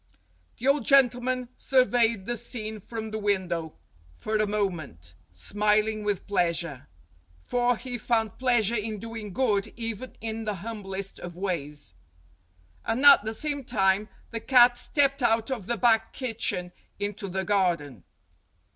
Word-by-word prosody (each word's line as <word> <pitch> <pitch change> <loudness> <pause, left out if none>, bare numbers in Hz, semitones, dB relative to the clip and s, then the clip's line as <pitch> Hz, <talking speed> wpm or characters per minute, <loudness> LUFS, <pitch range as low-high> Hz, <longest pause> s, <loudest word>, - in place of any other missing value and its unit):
The 250 - -3
old 280 -1 +3
gentleman 255 -1 +3
surveyed 240 -5 +2
the 240 - -2
scene 220 -2 -4
from 220 +1 -6
the 220 - -3
window 180 -6 -1 0.4
for 215 - -3
a 215 0 +1
moment, 160 - -3 0.2
smiling 210 +1 +1
with 205 -3 -2
pleasure; 170 -8 -1 0.5
for 245 - 0
he 245 0 -6
found 225 -2 -1
pleasure 240 -4 +2
in 215 -1 -2
doing 225 -1 -7
good 210 -3 0
even 230 +1 -4
in 225 0 -4
the 210 -1 -2
humblest 195 -1 -6
of 175 -1 -8
ways. 150 - -4 0.9
And 255 +5 -1
at 280 -6 +9
the 220 +1 -3
same 290 +1 -2
time 205 -3 +1 0.2
the 230 - -3
cat 245 0 +6
stepped 275 +1 +1
out 225 +1 +2
of 220 -8 -4
the 235 - -1
back 225 -2 +3
kitchen 225 -8 -2 0.3
into 205 0 -4
the 190 +1 -2
garden. 175 - 0
215 Hz, 140 wpm, -27 LUFS, 195-240 Hz, 0.9 s, at